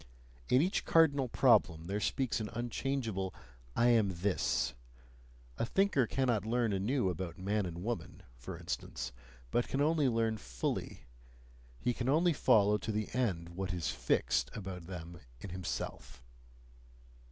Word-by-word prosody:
In 130 Hz, +4 st, +5 dB
each 185 Hz, -, 0 dB
cardinal 145 Hz, -5 st, +4 dB
problem 80 Hz, -6 st, +4 dB
there 100 Hz, +4 st, -2 dB
speaks 130 Hz, +3 st, 0 dB
an 105 Hz, -1 st, -3 dB
unchangeable 120 Hz, -4 st, -2 dB, 0.4 s
"I 120 Hz, +1 st, +4 dB
am 110 Hz, -4 st, +4 dB
this"; 95 Hz, +3 st, 0 dB, 0.9 s
a -, -, +2 dB
thinker 190 Hz, -, +2 dB
cannot 120 Hz, -6 st, +1 dB
learn 115 Hz, -1 st, +1 dB
anew 105 Hz, +3 st, +1 dB
about 90 Hz, +1 st, -5 dB
man 100 Hz, +1 st, 0 dB
and 85 Hz, +1 st, -6 dB
woman, 120 Hz, +2 st, -4 dB
for -, -, -8 dB
instance, -, -, -4 dB, 0.4 s
but 120 Hz, -, +1 dB
can 135 Hz, -, -2 dB
only 150 Hz, -2 st, +3 dB
learn 115 Hz, -1 st, +1 dB
fully -, -, -3 dB, 0.8 s
he 125 Hz, -, 0 dB
can 120 Hz, +2 st, -2 dB
only 165 Hz, +4 st, +4 dB
follow 105 Hz, -6 st, +4 dB
to 110 Hz, -, -3 dB
the 105 Hz, 0 st, -3 dB
end 95 Hz, -10 st, 0 dB
what 90 Hz, +1 st, -4 dB
is 85 Hz, -3 st, -1 dB
"fixed" -, -, +1 dB
about 95 Hz, -4 st, -6 dB
them 85 Hz, -2 st, -7 dB, 0.2 s
in 90 Hz, -, -7 dB
himself. 70 Hz, -7 st, -5 dB
105 Hz, 140 wpm, -33 LUFS, 90-125 Hz, 0.9 s, In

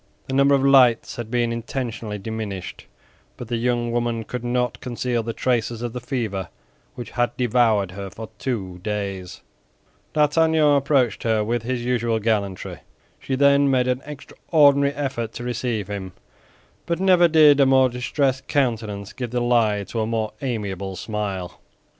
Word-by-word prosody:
The 130 Hz, -, -6 dB
number 140 Hz, +1 st, +4 dB
of 135 Hz, 0 st, +1 dB
lights 130 Hz, -4 st, +4 dB
had 120 Hz, -2 st, -5 dB
been 120 Hz, -1 st, 0 dB
intentionally 115 Hz, -3 st, -4 dB
diminished, 105 Hz, -2 st, -6 dB, 0.5 s
but 120 Hz, -, -8 dB
the 120 Hz, -, -1 dB
young 120 Hz, 0 st, 0 dB
woman 120 Hz, -1 st, -1 dB
could 125 Hz, +2 st, -6 dB
not 125 Hz, 0 st, -1 dB
conceal 120 Hz, -1 st, -2 dB
the 115 Hz, +1 st, -4 dB
traces 120 Hz, -1 st, -1 dB
of 120 Hz, -1 st, -4 dB
the 125 Hz, -, -5 dB
fever 110 Hz, -8 st, -3 dB, 0.5 s
which 120 Hz, -3 st, -8 dB
had 120 Hz, 0 st, -1 dB
devoured 115 Hz, -6 st, +2 dB
her 100 Hz, +1 st, -7 dB
for 110 Hz, +3 st, -9 dB
two 95 Hz, -9 st, -3 dB
days. 100 Hz, -3 st, -4 dB, 0.7 s
D'Artagnan 155 Hz, 0 st, +3 dB
approached 135 Hz, -6 st, +1 dB
her 110 Hz, -2 st, +1 dB
with 120 Hz, +2 st, -1 dB
his 120 Hz, +1 st, -3 dB
usual 120 Hz, -2 st, 0 dB
gallantry. 105 Hz, -4 st, -2 dB, 0.4 s
She 135 Hz, -, -3 dB
then 140 Hz, +1 st, +4 dB
made 130 Hz, -2 st, +2 dB
an 125 Hz, +1 st, 0 dB
extraordinary 140 Hz, -1 st, +2 dB
effort 130 Hz, -6 st, -3 dB
to 120 Hz, -, -7 dB
receive 120 Hz, -4 st, -2 dB
him, 95 Hz, -3 st, -6 dB, 0.7 s
but 170 Hz, 0 st, -1 dB
never 185 Hz, -2 st, +5 dB
did 155 Hz, -3 st, +6 dB
a 135 Hz, -, +5 dB
more 130 Hz, -1 st, +5 dB
distressed 130 Hz, +2 st, -1 dB
countenance 110 Hz, -7 st, -1 dB
give 125 Hz, -2 st, -5 dB
the 125 Hz, +1 st, -1 dB
lie 115 Hz, -4 st, +2 dB
to 115 Hz, +4 st, -5 dB
a 110 Hz, -, -1 dB
more 110 Hz, -1 st, -2 dB
amiable 100 Hz, -7 st, -3 dB
smile. 100 Hz, -4 st, -4 dB
120 Hz, 160 wpm, -22 LUFS, 110-130 Hz, 0.7 s, did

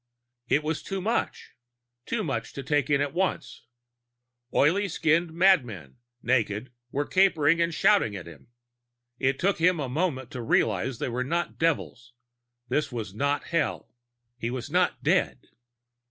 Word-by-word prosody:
It 150 Hz, -, +2 dB
was 155 Hz, 0 st, -2 dB
too 195 Hz, -, -4 dB
much, 220 Hz, +5 st, -2 dB, 0.6 s
too 230 Hz, -2 st, -1 dB
much 130 Hz, -9 st, -3 dB
to 140 Hz, -, -6 dB
take 145 Hz, +2 st, 0 dB
in 140 Hz, -1 st, +3 dB
at 145 Hz, -1 st, -1 dB
once. 185 Hz, -9 st, -2 dB, 0.8 s
Oily 190 Hz, +8 st, +3 dB
skinned 165 Hz, 0 st, +1 dB
madmen, 125 Hz, -, +2 dB, 0.3 s
naked, 120 Hz, -1 st, 0 dB, 0.2 s
were 145 Hz, +1 st, -1 dB
capering 170 Hz, -4 st, +3 dB
and 170 Hz, 0 st, +1 dB
shouting 160 Hz, -, +3 dB
at 95 Hz, -, -7 dB
him. 85 Hz, -, -13 dB, 0.7 s
It 135 Hz, 0 st, +1 dB
took 195 Hz, 0 st, +1 dB
him 175 Hz, 0 st, +3 dB
a 140 Hz, -, -2 dB
moment 130 Hz, -3 st, -2 dB
to 125 Hz, -, -5 dB
realize 115 Hz, +1 st, +1 dB
that -, -, -3 dB
they -, -, -2 dB
were 125 Hz, +2 st, -2 dB
not 170 Hz, +6 st, -2 dB
devils; 125 Hz, -6 st, -1 dB, 0.5 s
this 150 Hz, 0 st, -1 dB
was 110 Hz, -6 st, -5 dB
not 140 Hz, +6 st, -1 dB
Hell; 170 Hz, -2 st, -2 dB, 0.5 s
he 115 Hz, -, -2 dB
was 125 Hz, -1 st, -5 dB
not -, -, +1 dB
dead. -, -, 0 dB
145 Hz, 155 wpm, -27 LUFS, 125-170 Hz, 0.8 s, in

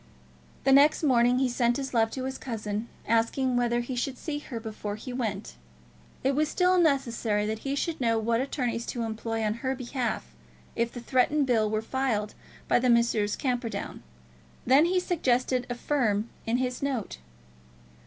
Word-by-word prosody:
The 270 Hz, -, +3 dB
next 285 Hz, +4 st, +5 dB
morning 245 Hz, -3 st, +4 dB
he 260 Hz, 0 st, +2 dB
sent 240 Hz, -1 st, +1 dB
his 270 Hz, -1 st, -4 dB
love 225 Hz, -2 st, +3 dB
to 260 Hz, -, -4 dB
his 265 Hz, 0 st, -4 dB
cousin, 215 Hz, -2 st, -4 dB, 0.2 s
asking 230 Hz, +3 st, +1 dB
whether 240 Hz, 0 st, +1 dB
he 250 Hz, +2 st, -5 dB
should 250 Hz, +1 st, -2 dB
see 300 Hz, -3 st, -4 dB
her 250 Hz, -5 st, -6 dB
before 215 Hz, -2 st, -5 dB
he 245 Hz, +4 st, -7 dB
went. 210 Hz, -, -4 dB, 0.7 s
It 270 Hz, -, +2 dB
was 305 Hz, +1 st, +1 dB
still 365 Hz, 0 st, +3 dB
necessary 235 Hz, -9 st, +1 dB
that 220 Hz, +1 st, -2 dB
he 275 Hz, +3 st, -2 dB
should 320 Hz, +1 st, -2 dB
know 230 Hz, -2 st, +2 dB
what 230 Hz, +2 st, +1 dB
attorneys 245 Hz, -4 st, -2 dB
to 240 Hz, -, -3 dB
employ 225 Hz, 0 st, -3 dB
on 215 Hz, 0 st, +1 dB
her 265 Hz, 0 st, -1 dB
behalf 240 Hz, -, -3 dB, 0.4 s
if 235 Hz, 0 st, 0 dB
the 240 Hz, -, -7 dB
threatened 265 Hz, +4 st, +2 dB
bill 225 Hz, -4 st, +2 dB
were 215 Hz, +1 st, -1 dB
filed 225 Hz, -5 st, -1 dB, 0.3 s
by -, -, +4 dB
Messrs. 235 Hz, -4 st, +2 dB
Camperdown. 245 Hz, -3 st, -3 dB, 0.6 s
Then 275 Hz, +5 st, +6 dB
he 365 Hz, +1 st, +2 dB
suggested 255 Hz, -7 st, 0 dB
a 245 Hz, -, -2 dB
firm 235 Hz, -5 st, 0 dB, 0.2 s
in 230 Hz, +2 st, +2 dB
his 250 Hz, -1 st, -2 dB
note. 260 Hz, -, -3 dB
245 Hz, 170 wpm, -28 LUFS, 225-270 Hz, 0.7 s, Then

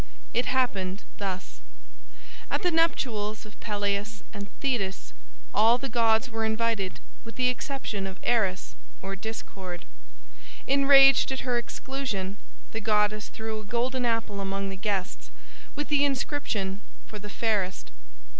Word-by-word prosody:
It 245 Hz, -, +2 dB
happened 200 Hz, -7 st, 0 dB, 0.2 s
thus: 185 Hz, -, -4 dB, 0.9 s
At 285 Hz, -, 0 dB
the 355 Hz, -, +3 dB
nuptials 245 Hz, -11 st, +1 dB
of 215 Hz, -, -14 dB
Peleus 205 Hz, 0 st, -2 dB
and 200 Hz, -1 st, -6 dB
Thetis 195 Hz, -, -1 dB, 0.4 s
all 225 Hz, +3 st, +6 dB
the 270 Hz, +1 st, -4 dB
gods 225 Hz, +1 st, +3 dB
were 225 Hz, -2 st, -3 dB
invited 220 Hz, -3 st, 0 dB, 0.2 s
with 230 Hz, -, -10 dB
the 250 Hz, -1 st, +3 dB
exception 250 Hz, -6 st, -3 dB
of 190 Hz, -, -7 dB
Eris, 200 Hz, -6 st, +1 dB, 0.3 s
or 195 Hz, 0 st, -3 dB
Discord. 195 Hz, -4 st, -6 dB, 0.8 s
Enraged 275 Hz, -1 st, +7 dB
at 265 Hz, -, -1 dB
her 245 Hz, -2 st, +1 dB
exclusion, 235 Hz, -7 st, -3 dB, 0.3 s
the 225 Hz, -, -4 dB
goddess 210 Hz, 0 st, +2 dB
threw 220 Hz, 0 st, -4 dB
a -, -, -8 dB
golden 245 Hz, +4 st, 0 dB
apple 225 Hz, -4 st, 0 dB
among 195 Hz, 0 st, -2 dB
the 195 Hz, -, -4 dB
guests, 190 Hz, -, -2 dB, 0.5 s
with 295 Hz, 0 st, -3 dB
the 290 Hz, -1 st, +4 dB
inscription, 245 Hz, -8 st, -1 dB, 0.2 s
"For 210 Hz, -, -8 dB
the 210 Hz, +1 st, -8 dB
fairest." 195 Hz, -, -1 dB
220 Hz, 135 wpm, -28 LUFS, 195-250 Hz, 0.9 s, Enraged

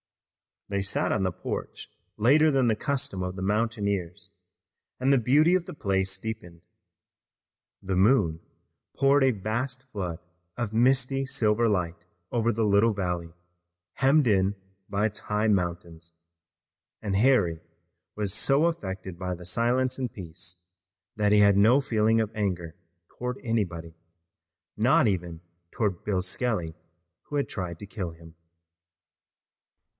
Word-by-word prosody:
They 100 Hz, 0 st, -1 dB
sat 95 Hz, -, 0 dB
on 100 Hz, -, +1 dB
the 95 Hz, -1 st, 0 dB
porch -, -, -6 dB, 0.3 s
later 145 Hz, +8 st, +5 dB
than 135 Hz, -4 st, +2 dB
the 110 Hz, -2 st, +2 dB
custom 140 Hz, -7 st, -2 dB
of 90 Hz, 0 st, -3 dB
the 95 Hz, -, -6 dB
mountaineers, 100 Hz, -3 st, -1 dB, 0.7 s
and 130 Hz, +2 st, +2 dB
the -, -, +5 dB
beauty 150 Hz, +9 st, +4 dB
of 185 Hz, -2 st, +2 dB
the -, -, -8 dB
place 95 Hz, -5 st, 0 dB
deepened. 95 Hz, -6 st, -7 dB, 1.2 s
The 95 Hz, -1 st, -1 dB
moon 95 Hz, -6 st, +3 dB, 0.6 s
poured 140 Hz, +1 st, +4 dB
a 135 Hz, -, +5 dB
vast 120 Hz, +5 st, -3 dB
flood 100 Hz, -10 st, -5 dB, 0.4 s
of 120 Hz, -3 st, -3 dB
misty, 130 Hz, +3 st, +3 dB
silver 115 Hz, -3 st, +1 dB
light 90 Hz, -4 st, -1 dB, 0.3 s
over 120 Hz, -1 st, +1 dB
the 115 Hz, +1 st, -1 dB
little 105 Hz, +2 st, +4 dB
valley, 90 Hz, -4 st, -3 dB, 0.6 s
hemmed 140 Hz, +2 st, +4 dB
in 100 Hz, -1 st, +2 dB, 0.3 s
by 100 Hz, +1 st, 0 dB
its 105 Hz, -1 st, -8 dB
high 105 Hz, +1 st, 0 dB
mountains, 85 Hz, -3 st, -2 dB, 0.9 s
and 100 Hz, -2 st, -2 dB
Harry 105 Hz, -9 st, +3 dB, 0.6 s
was 105 Hz, -3 st, -2 dB
so 135 Hz, +8 st, +2 dB
affected 95 Hz, -, -4 dB
by 90 Hz, -1 st, -3 dB
the 90 Hz, 0 st, -11 dB
silence 125 Hz, +7 st, +1 dB
and 125 Hz, -2 st, -2 dB
peace 85 Hz, -1 st, -9 dB, 0.5 s
that 105 Hz, -1 st, +2 dB
he 105 Hz, -, +6 dB
had 100 Hz, -1 st, +5 dB
no 115 Hz, +7 st, +6 dB
feeling 110 Hz, -2 st, +2 dB
of 110 Hz, -1 st, -2 dB
anger 90 Hz, -6 st, -3 dB, 0.4 s
toward 125 Hz, +1 st, -4 dB
anybody, 90 Hz, -9 st, -2 dB, 0.8 s
not -, -, +4 dB
even 90 Hz, -5 st, -2 dB, 0.3 s
toward 100 Hz, -5 st, -2 dB
Bill 95 Hz, -3 st, 0 dB
Skelly, 90 Hz, -4 st, -2 dB, 0.5 s
who 145 Hz, -, -7 dB
had 140 Hz, -, 0 dB
tried 90 Hz, -4 st, -4 dB
to -, -, -8 dB
kill 95 Hz, -4 st, -5 dB
him. 80 Hz, 0 st, -15 dB
105 Hz, 140 wpm, -27 LUFS, 90-120 Hz, 1.2 s, he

